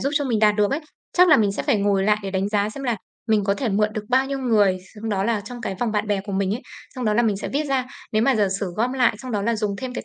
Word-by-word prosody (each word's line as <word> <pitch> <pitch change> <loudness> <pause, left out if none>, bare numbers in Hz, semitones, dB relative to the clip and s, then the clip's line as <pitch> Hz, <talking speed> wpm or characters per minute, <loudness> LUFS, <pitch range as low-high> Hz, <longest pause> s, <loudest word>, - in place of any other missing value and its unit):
giúp 275 - 0
cho 285 -1 +1
mình 235 -4 0
đạt 210 -1 +4
được 210 -1 +2
ấy. 280 - -1 0.4
Chắc 360 0 +6
là 310 - +8
mình 205 -3 +2
sẽ - - -3
phải - - +2
ngồi 200 -1 +2
lại 210 +1 +4
để 195 - -4
đánh 190 +1 -1
giá 205 -1 +1
xem 275 +4 -8
là 240 -3 0 0.3
mình 215 -2 +3
có 200 0 +2
thể 245 +4 -2
mượn 210 +1 +2
được 215 -1 -4
bao 260 +2 +3
nhiêu 275 0 -3
người, 215 -7 +3 0.2
xong 220 +1 -6
đó 195 -2 0
là 230 -2 +1
trong 240 +4 -9
cái 195 - -3
vòng 235 -3 0
bạn 210 0 0
bè 205 -2 0
của 200 0 -7
mình 195 +1 0
ấy, 245 - -6 0.3
xong 255 -2 -4
đó 215 -1 +2
là 240 - +3
mình 210 -4 +1
sẽ - - -5
viết 290 +3 -1
ra. 265 -2 0 0.3
Nếu 215 +1 +2
mà 270 +1 +3
giả 205 -2 +2
sử 185 -3 -3
gom 240 +4 0
lại, 255 -3 +3
xong 255 -1 -7
đó 205 - 0
là 230 +2 0
dùng 210 -2 -2
thêm 255 +2 -6
cái - - -5
215 Hz, 335 wpm, -23 LUFS, 205-250 Hz, 0.4 s, là